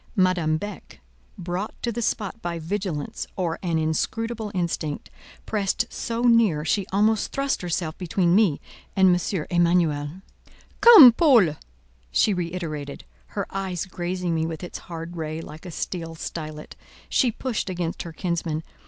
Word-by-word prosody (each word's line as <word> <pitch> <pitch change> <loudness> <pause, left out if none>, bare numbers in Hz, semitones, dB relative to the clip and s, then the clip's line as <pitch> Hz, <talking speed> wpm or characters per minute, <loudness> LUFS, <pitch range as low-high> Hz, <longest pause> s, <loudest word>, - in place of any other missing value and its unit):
Madame 180 -5 +2
Beck, 205 +5 -8 0.4
brought 180 +3 -4
to 235 - 0
the 235 +1 -3
spot 215 0 -2
by 170 -1 -3
vigilance 165 -2 -3
or 170 -3 -2
an 170 -3 0
inscrutable 215 +8 -2
instinct, 155 - -2 0.3
pressed 210 +2 0
so 230 +1 -3
near, 225 -11 +4
she 195 +3 0
almost 215 +2 +2
thrust 275 0 -1
herself 170 -3 -2
between 175 -1 +1
me 190 -7 +4 0.4
and 190 -2 +5
M. 180 -2 -2
Emanuel. 170 -4 +2 0.7
"Come, 415 - +11
Paul!" 230 - +4 0.6
she 210 - +3
reiterated, 165 -5 -4 0.3
her 200 - 0
eye 190 -2 -3
grazing 180 -1 -2
me 160 0 0
with 165 +1 -6
its 175 - -6
hard 170 +1 -6
ray 155 0 -4
like 160 +2 -10
a - - -7
steel 165 0 -4
stylet. 155 -2 -7 0.3
She 250 -4 +2
pushed 230 -3 -3
against 175 -2 -3
her 170 - -7
kinsman. 165 -2 -2
180 Hz, 145 wpm, -24 LUFS, 160-205 Hz, 0.7 s, Come